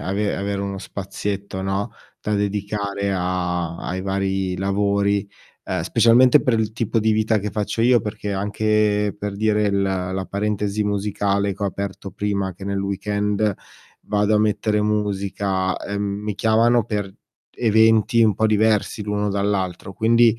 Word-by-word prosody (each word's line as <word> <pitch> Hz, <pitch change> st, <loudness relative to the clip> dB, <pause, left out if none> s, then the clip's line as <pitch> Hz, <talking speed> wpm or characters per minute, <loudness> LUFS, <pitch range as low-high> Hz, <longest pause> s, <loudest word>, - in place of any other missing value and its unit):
ave 100 Hz, +2 st, -1 dB
avere 100 Hz, 0 st, -2 dB
uno 100 Hz, -1 st, -4 dB
spazietto, 100 Hz, 0 st, -5 dB
no, 95 Hz, +1 st, -2 dB, 0.3 s
da 105 Hz, -, -3 dB
dedicare 100 Hz, 0 st, -2 dB
a 90 Hz, -2 st, -1 dB
ai 95 Hz, +1 st, -4 dB
vari 95 Hz, -1 st, -1 dB
lavori, 100 Hz, +1 st, +1 dB, 0.4 s
ehm, -, -, -2 dB
specialmente 125 Hz, +4 st, +5 dB
per 120 Hz, -3 st, +1 dB
il 110 Hz, -1 st, -1 dB
tipo 115 Hz, +1 st, 0 dB
di 110 Hz, +1 st, +2 dB
vita 110 Hz, 0 st, +2 dB
che 105 Hz, +1 st, -3 dB
faccio 105 Hz, +2 st, -2 dB
io. 120 Hz, 0 st, +5 dB
Perché 105 Hz, -1 st, -4 dB
anche 105 Hz, +1 st, +1 dB
per 105 Hz, -1 st, -4 dB
dire, 105 Hz, 0 st, +1 dB
l 100 Hz, 0 st, +2 dB
la 95 Hz, -1 st, -2 dB
parentesi 105 Hz, 0 st, -1 dB
musicale 100 Hz, 0 st, 0 dB
che 100 Hz, -, -9 dB
ho -, -, +2 dB
aperto 100 Hz, -1 st, -5 dB
prima 100 Hz, -1 st, -2 dB
che 95 Hz, +2 st, -10 dB
nel 100 Hz, 0 st, -2 dB
weekend 105 Hz, +1 st, 0 dB, 0.5 s
vado 105 Hz, +1 st, +1 dB
a -, -, +4 dB
mettere 105 Hz, 0 st, +1 dB
musica, 100 Hz, -3 st, -1 dB
ehm, 100 Hz, 0 st, -4 dB
mi 100 Hz, 0 st, -3 dB
chiamano 115 Hz, +2 st, +3 dB
per 105 Hz, -3 st, -3 dB, 0.4 s
eventi 110 Hz, +1 st, +3 dB
un 110 Hz, -2 st, +4 dB
po' 110 Hz, -, +3 dB
diversi 110 Hz, 0 st, +1 dB
l'uno 105 Hz, 0 st, -1 dB
dall'altro, 100 Hz, -2 st, -1 dB
quindi 115 Hz, +2 st, +4 dB
100 Hz, 150 wpm, -22 LUFS, 100-105 Hz, 0.5 s, specialmente